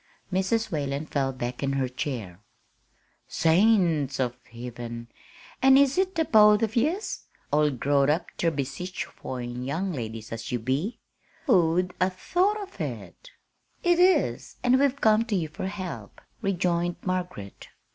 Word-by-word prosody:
Mrs. 190 +5 0
Whalen 145 -1 -2
fell 135 -3 -1
back 125 -1 -5
in 135 -1 0
her 135 -1 0
chair. 120 - -5 0.9
"Saints 165 - +3
of 125 -2 0 0.2
Hiven, 120 0 -7 0.5
an' 265 0 +7
is 280 -1 +4
it 375 0 0
the 325 -1 +1
both 210 -2 +6
of 225 0 -1
yez, 315 - -1 0.3
all 150 0 +3
growed 140 +1 +1
up 165 +3 +1
ter 170 - +1
be 145 -4 -1
sich 180 +8 -5
foine 125 -8 -6
young 175 +8 -2
ladies 115 -4 -6
as 115 0 -5
ye 125 - +1
be? 135 - -2 0.5
Who'd 180 - +3
'a' 185 - +4
thought 385 - -1
it!" - - -6 0.5
"It 350 0 +3
is, 365 +1 +2
and 255 +1 +4
we've 280 0 +2
come 220 -1 +4
to 220 -3 -1
you 165 -4 -1
for 185 +5 -5
help," 190 -3 -7 0.2
rejoined 175 -3 0
Margaret. 180 - -4
170 Hz, 145 wpm, -26 LUFS, 130-220 Hz, 0.9 s, an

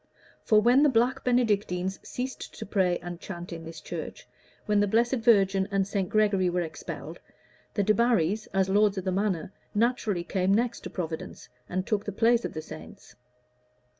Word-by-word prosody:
For 215 - +5
when 245 +5 +5
the 295 - +5
black 245 0 +1
Benedictines 205 -7 +1
ceased 255 +1 -6
to - - -6
pray 185 -3 +1
and 175 -1 -6
chant 175 -2 -7
in 165 -1 -7
this 165 0 -8
church, - - -7 0.4
when 210 -1 +2
the 205 - +3
Blessed 235 +5 +2
Virgin 195 -5 +3
and 195 -1 0
St. 195 -3 -1
Gregory 200 -4 +2
were 175 0 0
expelled, 160 -1 -7 0.6
the 205 - +2
Debarrys, 215 -2 +2
as 190 -1 +2
lords 205 +1 +3
of 190 - -3
the 185 - 0
manor, 190 -2 -1 0.2
naturally 215 -5 +1
came 190 +2 +1
next 235 +1 0
to - - -8
Providence 165 -3 -6 0.2
and 185 +1 -2
took 210 -2 0
the 205 - -3
place 230 +3 +3
of - - -4
the 155 - -5
saints. - - -11
200 Hz, 175 wpm, -27 LUFS, 185-225 Hz, 0.6 s, For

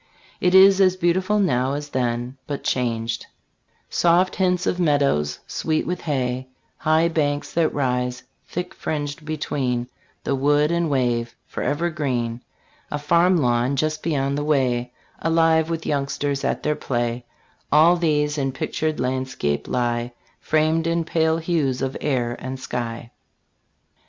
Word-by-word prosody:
It 180 +1 +2
is 195 +1 +8
as 185 -1 +4
beautiful 185 +3 +1
now 135 -9 +1
as 145 +1 -4
then, 120 -1 -2
but 145 -1 -4
changed, 115 -3 -1 0.4
" - - -48 0.3
Soft 175 +2 +3
hints 180 -1 +1
of 180 - 0
meadows, 140 - +2
sweet 155 -1 -1
with 180 +1 -3
hay; 130 -4 -2 0.3
High 160 +1 +3
banks 145 -3 -1
that 165 -2 +2
rise, 125 -2 -1 0.2
thick 180 +1 -4
fringed, 145 0 -4
between 135 -5 -2 0.4
The - - 0
wood 145 +3 +2
and 170 -1 +1
wave, 120 -4 0
forever 150 +6 -2
green; 125 -6 -2 0.5
A 150 - -2
farm 170 +5 +3
lawn, 125 -1 +1
just 155 +2 -1
beyond 140 -3 0
the - - -2
way, 125 -5 +1 0.3
Alive 165 -1 +3
with 165 -1 -3
youngsters 140 0 -1
at - - -1
their 150 0 +1
play: 120 -2 -2 0.5
All 160 +4 +6
these 150 -3 +1
in 135 -1 -1
pictured 155 +3 -2
landscape 130 - -1
lie, 120 -1 -1 0.3
Framed 155 +1 +1
in 165 0 +1
pale 160 -1 +1
hues 160 -6 0
of 135 0 -2
air 120 -4 0
and 130 0 -5
sky." 120 -2 -5
145 Hz, 140 wpm, -23 LUFS, 125-165 Hz, 0.5 s, is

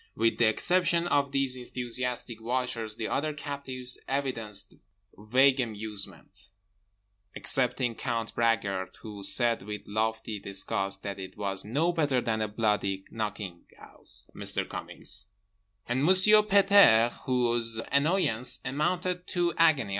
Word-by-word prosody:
With 115 +1 +1
the 120 - +5
exception 170 +7 +3
of 140 -2 +2
these 135 -2 +1
enthusiastic 125 -1 -4
watchers, 120 -2 -2
the 110 - -3
other 155 +2 -1
captives 140 -4 -4
evidenced 115 -7 -2 0.4
vague 130 +6 +3
amusement—excepting 105 +2 -4
Count 115 -2 -3
Bragard 100 -5 0
who 105 -2 -8
said 115 +3 +2
with 105 +2 -6
lofty 110 0 -2
disgust 100 0 -3
that 100 -1 -5
it 95 +1 -8
was 100 -2 +1
"no 150 +11 0
better 145 -6 +1
than 110 -2 -1
a 110 - 0
bloody 105 -3 -1
knocking 105 -5 -5
'ouse, - - -6
Mr. - - -2
Cummings" 100 0 -5 0.6
and 125 +3 0
Monsieur 190 +5 +6
Pet 200 -1 +3
airs 120 - +6
whose 120 -3 0
annoyance 140 - +1
amounted 180 +6 -1
to 175 -2 0
agony. 155 -10 +3
115 Hz, 125 wpm, -28 LUFS, 105-140 Hz, 0.6 s, Monsieur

